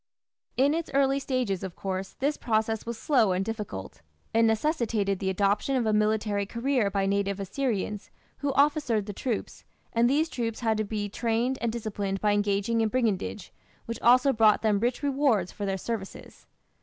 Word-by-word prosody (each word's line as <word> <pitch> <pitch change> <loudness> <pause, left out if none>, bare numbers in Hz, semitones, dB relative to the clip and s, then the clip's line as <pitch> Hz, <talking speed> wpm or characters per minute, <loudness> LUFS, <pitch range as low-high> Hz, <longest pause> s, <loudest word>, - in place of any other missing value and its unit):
In 275 +3 +4
its 330 0 -2
early 275 0 +3
stages, 250 -9 -1
of 190 -2 -6
course, 190 0 -4
this 285 +3 -1
process 220 -1 -1
was 235 -1 -4
slow 230 -8 +3
and 185 +1 -1
difficult. 205 - -6 0.3
It 225 - +4
necessitated 225 - +1
the 190 - -1
adoption 200 +7 +1
of 250 -3 +1
a 215 - +2
military 210 -1 +1
career 240 -1 0
by 195 -1 0
native 200 0 0
Assyrians, 210 -1 -2 0.3
who 285 0 0
officered 280 -6 +2
the 205 - -6
troops, 230 +2 -4 0.3
and 235 +1 +3
these 305 +4 +2
troops 230 -6 -4
had 225 -2 +1
to 215 - 0
be 210 0 -3
trained 235 +4 -1
and 235 - 0
disciplined 205 -4 -3
by 210 +1 +2
engaging 205 +2 +1
in 220 - +2
brigandage, 210 - -1 0.3
which 230 - -5
also 255 +3 +5
brought 220 -1 +4
them 210 -2 +2
rich 245 +5 -1
rewards 270 -10 +1
for 205 - -5
their 195 0 -1
services. 200 0 -7
220 Hz, 175 wpm, -27 LUFS, 200-250 Hz, 0.3 s, also